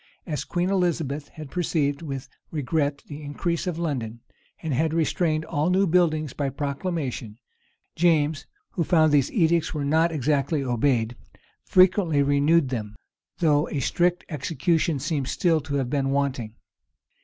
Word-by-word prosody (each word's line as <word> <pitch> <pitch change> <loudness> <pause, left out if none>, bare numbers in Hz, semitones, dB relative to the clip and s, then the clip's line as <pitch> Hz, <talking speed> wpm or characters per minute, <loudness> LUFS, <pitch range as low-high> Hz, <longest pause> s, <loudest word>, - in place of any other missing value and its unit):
As 155 -5 -3
Queen 175 +2 -1
Elizabeth 160 -6 0
had 155 -3 -10
perceived 150 -5 0
with 135 -5 -5 0.2
regret 145 -1 -1
the 145 +1 -8
increase 170 +5 -2
of 175 -3 -2
London, 125 -9 -3 0.4
and 160 -3 -1
had 160 +4 +1
restrained 160 -1 +1
all 155 +1 0
new 190 +2 +3
buildings 155 -5 +2
by 140 -2 -1
proclamation, 140 - -4 0.6
James, 155 -3 +2 0.2
who 170 - -1
found 160 -2 +4
that 145 - +5
these 135 - +1
edicts 165 -4 +2
were 145 -2 -2
not 160 +4 +3
exactly 145 0 0
obeyed, 120 -2 +1 0.5
frequently 180 -5 +4
renewed 145 +1 +3
them; 110 -4 -4 0.4
though 150 -2 +2
a 145 - -2
strict 175 +6 +1
execution 160 +1 0
seems 140 -1 -2
still 165 0 +2
to 140 0 -4
have 130 -3 -1
been 135 -2 0
wanting. 135 -5 -1
150 Hz, 145 wpm, -25 LUFS, 140-165 Hz, 0.6 s, that